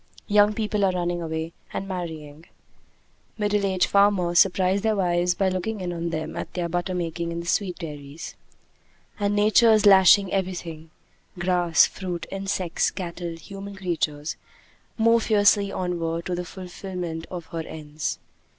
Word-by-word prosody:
Young 210 Hz, 0 st, +4 dB
people 210 Hz, -2 st, -1 dB
are 190 Hz, -, +4 dB
running 175 Hz, -1 st, -1 dB
away 160 Hz, 0 st, -4 dB, 0.2 s
and 195 Hz, -, -4 dB
marrying; 160 Hz, -4 st, -6 dB, 0.9 s
middle 210 Hz, -1 st, +1 dB
aged 190 Hz, -2 st, +2 dB
farmers 195 Hz, -4 st, +3 dB
surprise 190 Hz, +1 st, +3 dB
their 220 Hz, 0 st, +1 dB
wives 175 Hz, -2 st, +1 dB
by 195 Hz, -, +1 dB
looking 190 Hz, +4 st, -2 dB
in 180 Hz, -1 st, -3 dB
on 170 Hz, 0 st, -3 dB
them 160 Hz, -1 st, -4 dB
at -, -, -5 dB
their 175 Hz, -2 st, -1 dB
butter 175 Hz, +2 st, -2 dB
making 170 Hz, -1 st, -3 dB
in 170 Hz, -, -4 dB
the 170 Hz, -, -6 dB
sweet 180 Hz, +1 st, 0 dB
dairies; 150 Hz, -2 st, -8 dB, 0.9 s
and 205 Hz, 0 st, +1 dB
Nature 215 Hz, +2 st, +5 dB
is 215 Hz, -1 st, +4 dB
lashing 195 Hz, 0 st, +7 dB
everything 175 Hz, -4 st, -3 dB, 0.5 s
grass, 175 Hz, -1 st, +4 dB
fruit, 180 Hz, -3 st, -5 dB
insects, 195 Hz, -3 st, -1 dB
cattle, 170 Hz, -2 st, -5 dB
human 195 Hz, +3 st, -9 dB
creatures 165 Hz, -5 st, -2 dB, 0.6 s
more 230 Hz, 0 st, +4 dB
fiercely 205 Hz, -2 st, +3 dB
onward 170 Hz, -3 st, -2 dB
to 180 Hz, -, -2 dB
the 175 Hz, 0 st, -3 dB
fulfillment 180 Hz, -3 st, -6 dB
of 175 Hz, -3 st, -6 dB
her 165 Hz, -, -3 dB
ends. 155 Hz, -2 st, -5 dB
180 Hz, 150 wpm, -25 LUFS, 170-195 Hz, 0.9 s, lashing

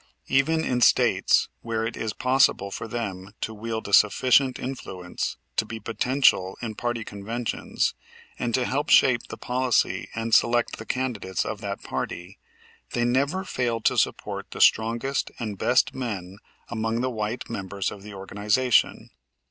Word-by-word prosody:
Even 160 Hz, +4 st, +2 dB
in 125 Hz, -1 st, 0 dB
States -, -, +4 dB
where 115 Hz, -1 st, -2 dB
it 115 Hz, -, -4 dB
is 110 Hz, -, -3 dB
possible 125 Hz, -5 st, +2 dB
for 115 Hz, -, -5 dB
them 100 Hz, -4 st, -5 dB
to 110 Hz, -, -3 dB
wield 110 Hz, 0 st, -4 dB
a 100 Hz, -, -7 dB
sufficient 130 Hz, +6 st, +5 dB
influence 95 Hz, -9 st, -5 dB, 0.2 s
to -, -, +3 dB
be 110 Hz, +1 st, -7 dB
potential 115 Hz, -4 st, +2 dB
in 115 Hz, -3 st, -4 dB
party 120 Hz, +1 st, -2 dB
conventions, 110 Hz, +4 st, -2 dB, 0.5 s
and 120 Hz, -, -1 dB
to 130 Hz, -1 st, +1 dB
help 145 Hz, +4 st, -1 dB
shape 125 Hz, -3 st, +5 dB
the -, -, -8 dB
policy 125 Hz, -1 st, 0 dB
and 115 Hz, 0 st, -3 dB
select 120 Hz, +1 st, +3 dB
the 110 Hz, -, -9 dB
candidates 105 Hz, -10 st, -2 dB
of 105 Hz, -1 st, -5 dB
that 100 Hz, -1 st, -5 dB
party, 90 Hz, +2 st, -5 dB, 0.5 s
they 120 Hz, -, +1 dB
never 140 Hz, +10 st, +1 dB
fail 120 Hz, -10 st, -1 dB
to -, -, +2 dB
support -, -, -1 dB
the -, -, -8 dB
strongest 115 Hz, +5 st, +2 dB
and 110 Hz, -5 st, -5 dB
best 125 Hz, +2 st, +3 dB
men 100 Hz, -7 st, -5 dB, 0.3 s
among 115 Hz, 0 st, -1 dB
the 130 Hz, 0 st, -1 dB
white 110 Hz, +1 st, -3 dB
members 100 Hz, -3 st, -3 dB
of 100 Hz, -, -9 dB
the 105 Hz, 0 st, -10 dB
organization. 105 Hz, +6 st, +1 dB
115 Hz, 155 wpm, -25 LUFS, 105-125 Hz, 0.5 s, sufficient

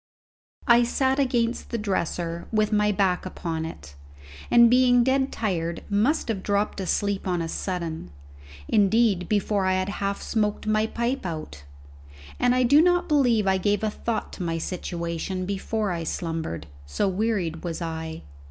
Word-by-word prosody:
I 240 Hz, 0 st, +6 dB
sat 265 Hz, +3 st, +1 dB
against 240 Hz, -3 st, 0 dB
the 235 Hz, -, -2 dB
dresser 170 Hz, -4 st, -2 dB
with 215 Hz, -1 st, +1 dB
my 210 Hz, 0 st, +3 dB
back 190 Hz, -2 st, +1 dB
upon 165 Hz, -3 st, -4 dB
it, 70 Hz, -, -10 dB, 0.6 s
and 235 Hz, 0 st, +7 dB
being 245 Hz, 0 st, +5 dB
dead 265 Hz, +1 st, +1 dB
tired 170 Hz, -6 st, -2 dB
must 235 Hz, +11 st, +2 dB
have 205 Hz, -4 st, -1 dB
dropped 205 Hz, +1 st, -1 dB
asleep 195 Hz, +1 st, -1 dB
on 180 Hz, -1 st, 0 dB
a 165 Hz, -, -2 dB
sudden 165 Hz, -, -4 dB, 0.6 s
indeed, 205 Hz, -3 st, +3 dB
before 205 Hz, -2 st, +1 dB
I 190 Hz, -, +3 dB
had 185 Hz, +1 st, 0 dB
half 200 Hz, 0 st, -1 dB
smoked 210 Hz, -2 st, -1 dB
my 215 Hz, 0 st, +2 dB
pipe 235 Hz, +4 st, -2 dB
out, 155 Hz, -, -6 dB, 0.7 s
and 245 Hz, 0 st, +3 dB
I 255 Hz, -, +3 dB
do 285 Hz, +5 st, +6 dB
not 355 Hz, +1 st, +3 dB
believe 250 Hz, -, +3 dB
I 190 Hz, -1 st, +2 dB
gave 205 Hz, +3 st, 0 dB
a 215 Hz, -, +1 dB
thought 230 Hz, +1 st, -3 dB
to -, -, -8 dB
my 165 Hz, -1 st, -1 dB
situation 170 Hz, +1 st, -4 dB
before 200 Hz, +2 st, -2 dB
I 170 Hz, -1 st, -3 dB
slumbered, 160 Hz, -, -4 dB, 0.2 s
so 70 Hz, -, 0 dB
wearied 190 Hz, -5 st, -1 dB
was 170 Hz, -2 st, -4 dB
I. 160 Hz, -, -5 dB
200 Hz, 160 wpm, -25 LUFS, 170-230 Hz, 0.7 s, and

